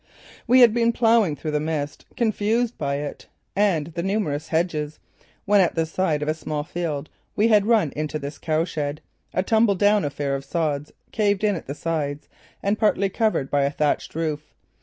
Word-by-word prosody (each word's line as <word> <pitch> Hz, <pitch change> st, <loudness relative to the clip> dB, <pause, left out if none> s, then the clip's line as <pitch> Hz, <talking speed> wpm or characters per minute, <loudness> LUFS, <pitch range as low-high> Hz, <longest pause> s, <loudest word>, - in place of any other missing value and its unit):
We 255 Hz, +2 st, +6 dB
had 235 Hz, -3 st, +7 dB
been 235 Hz, 0 st, +3 dB
ploughing 225 Hz, -8 st, +3 dB
through 155 Hz, +2 st, -4 dB
the 150 Hz, -, +1 dB
mist, 150 Hz, -2 st, -3 dB
confused 230 Hz, +1 st, +1 dB
by 140 Hz, -1 st, -2 dB
it 145 Hz, 0 st, -6 dB, 0.3 s
and 190 Hz, -7 st, +2 dB
the 170 Hz, -, -2 dB
numerous 175 Hz, -6 st, -1 dB
hedges, 155 Hz, -3 st, -1 dB, 0.5 s
when 205 Hz, 0 st, +5 dB
at 180 Hz, -, +1 dB
the 165 Hz, -1 st, +1 dB
side 160 Hz, -2 st, 0 dB
of -, -, -4 dB
a 155 Hz, -, +2 dB
small 155 Hz, -1 st, -4 dB
field 155 Hz, -3 st, -3 dB, 0.3 s
we 215 Hz, +2 st, +3 dB
had 210 Hz, -2 st, +4 dB
run 215 Hz, -, +3 dB
into 155 Hz, 0 st, -2 dB
this 140 Hz, 0 st, -7 dB
cowshed, 155 Hz, -2 st, -1 dB, 0.3 s
a 185 Hz, -, 0 dB
tumbledown 210 Hz, -1 st, +3 dB
affair 145 Hz, -1 st, -2 dB
of 135 Hz, 0 st, -3 dB
sods, 150 Hz, -2 st, -2 dB, 0.2 s
caved 205 Hz, -2 st, +1 dB
in 205 Hz, -2 st, +3 dB
at 165 Hz, -, -7 dB
the 140 Hz, -, -4 dB
sides 150 Hz, -3 st, -3 dB, 0.4 s
and 200 Hz, +2 st, 0 dB
partly 200 Hz, -2 st, +2 dB
covered 215 Hz, -10 st, 0 dB
by 145 Hz, -, +3 dB
a 140 Hz, -, +2 dB
thatched 150 Hz, +1 st, -1 dB
roof. 155 Hz, -2 st, -3 dB
165 Hz, 180 wpm, -23 LUFS, 150-205 Hz, 0.5 s, had